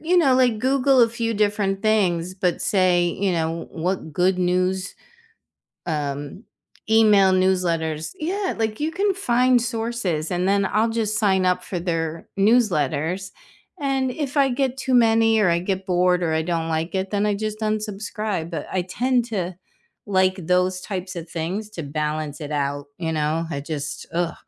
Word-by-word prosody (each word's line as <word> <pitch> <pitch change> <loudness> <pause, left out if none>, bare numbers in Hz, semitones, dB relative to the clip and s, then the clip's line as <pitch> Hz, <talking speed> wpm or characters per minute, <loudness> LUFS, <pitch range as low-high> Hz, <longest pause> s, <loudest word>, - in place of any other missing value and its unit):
you 345 +3 +1
know, 285 -7 +5
like, 250 -4 +3
Google 265 +1 +3
a 230 - +3
few 230 -1 -2
different 205 -1 0
things, 185 -5 +1
but 185 -2 -1
say, 185 -3 +3
you 185 +2 0
know, 165 0 -2
what 175 -1 -3
good 180 +4 +1
news, 185 +1 0 0.9
um, 145 +2 -3 0.5
email 210 -4 +5
newsletters 170 -4 0
yeah, 375 +5 -2
like, 220 +2 -2
you 310 - 0
can 390 +4 0
find 250 -7 +3
sources, 225 -9 -2
and 180 +1 0
then 200 0 +2
I'll 220 +3 +2
just 220 -2 -1
sign 190 -4 +2
up 180 0 +1
for 180 - -4
their 165 -2 -3
newsletters 190 - +1 0.5
and, 270 -2 0
if 285 +1 -4
I 275 -1 +4
get 260 0 -1
too 265 -1 -3
many 225 -1 +4
or 205 - +4
I 170 0 +2
get 190 +1 -3
bored 180 0 +2
or 160 - 0
I 160 - +1
don't 165 -1 -2
like 160 +1 -2
it, 190 0 -2
then 205 0 0
I 210 -1 +1
just 215 +1 -4
unsubscribe, 210 -4 -3
but 165 - -4
I 185 - 0
tend 245 +6 0
to 185 -6 -3 0.5
like 185 -2 +2
those 180 0 +2
types 185 -1 -5
of 170 0 -7
things 185 +6 -3
to 175 -6 -6
balance 150 0 -3
it 150 -1 -6
out, 145 0 -2
you 165 -2 -2
know, 155 +1 0
I 140 - -3
just 145 -1 -5
ugh. 170 0 -1
190 Hz, 170 wpm, -23 LUFS, 170-225 Hz, 0.9 s, know